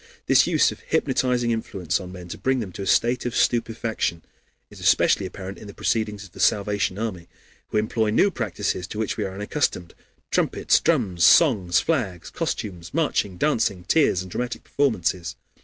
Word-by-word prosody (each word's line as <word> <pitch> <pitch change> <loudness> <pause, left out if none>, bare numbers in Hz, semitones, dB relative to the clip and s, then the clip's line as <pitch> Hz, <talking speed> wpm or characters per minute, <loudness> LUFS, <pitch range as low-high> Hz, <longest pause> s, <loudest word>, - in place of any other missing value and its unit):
This - - +5
use - - +3
of - - -10
hypnotizing 125 -2 0
influence 100 -7 -2
on 90 -2 -8
men 90 -1 -9
to - - -6
bring 130 +6 +1
them 105 -6 -5
to 100 - -8
a 95 - -4
state 120 +1 +2
of 120 - -4
stupefaction 115 -7 0 0.5
is - - -13
especially 95 - +3
apparent 95 +1 -8
in 105 - -11
the 100 - -11
proceedings 105 -2 -1
of 95 - -13
the - - -14
Salvation 100 -2 +1
Army, 100 -6 -4 0.4
who - - -2
employ 110 +1 +1
new 195 - +3
practices 100 - -3
to 105 - -8
which 110 -1 -1
we 105 - -2
are 95 -1 -6
unaccustomed: 105 - -2 0.4
trumpets, - - +2
drums, 90 -4 +1
songs, 95 - +5
flags, 105 - -2
costumes, 90 0 -4
marching, 105 - 0
dancing, 110 -7 0
tears, 95 - +2
and 90 - -11
dramatic 125 +4 -4
performances. 90 - -1
105 Hz, 175 wpm, -24 LUFS, 90-115 Hz, 0.5 s, This